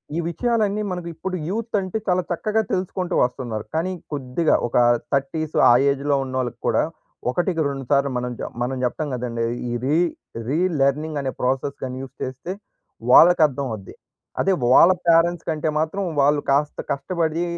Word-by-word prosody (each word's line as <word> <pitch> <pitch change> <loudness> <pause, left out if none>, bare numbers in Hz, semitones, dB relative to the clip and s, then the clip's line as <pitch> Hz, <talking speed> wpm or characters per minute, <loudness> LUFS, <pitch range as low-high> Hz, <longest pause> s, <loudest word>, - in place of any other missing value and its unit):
ఈ - - -1
విషయాలన్నీ 215 +1 0
మనకు 180 -2 -4
ఇప్పుడు 185 +3 -4
యూత్ 225 +4 -3
అంటే 190 +2 -3
చాలా 180 -1 +2
చక్కగా 215 +5 0
తెలుసుకుంటూ 185 -1 -2
వస్తున్నారు. 120 -4 -2
కానీ 170 +4 0 0.2
కొద్దిగా 145 +3 +1
ఒక - - -8 0.4
30స్ 150 +3 -1
ఆ - - +8 0.2
ఏజ్‌లో 140 +1 0
ఉన్నోళ్ళకి 130 -2 -3
కూడా - - +3 0.5
ఒకటికి 175 +4 0
రెండు 135 -1 -4
సార్లు 140 0 +3
మనం 125 0 -3
చా - - -3
మనం 130 +2 -1
చెప్తాం 150 +5 -1
కదండీ! 120 -2 -2 0.2
ఈ - - -2
రీ 145 +4 +2 0.5
రీ 145 +6 0 0.2
లెర్నింగ్ 150 +2 +1
అనే 135 -1 -2
ప్రాసెస్ 135 +2 -1
గాని 130 -1 -4
యూజ్ 135 0 -10
చేస్తే 130 +7 -5 0.6
వాళ్ళకి 175 +5 +8
అర్థం 140 0 -4
అవుద్ది. 100 -3 -9 0.4
అదే 195 - +3
వాళ్ళ 150 +8 +7 0.2
పేరెంట్స్ 170 0 +3
కంటే 155 0 -1
మాత్రం 160 +6 -1 0.2
వాళ్ళు 145 +1 +3
కాస్త 145 +2 +1
కష్టపడి 165 +3 -1
150 Hz, 155 wpm, -22 LUFS, 130-175 Hz, 0.6 s, ఆ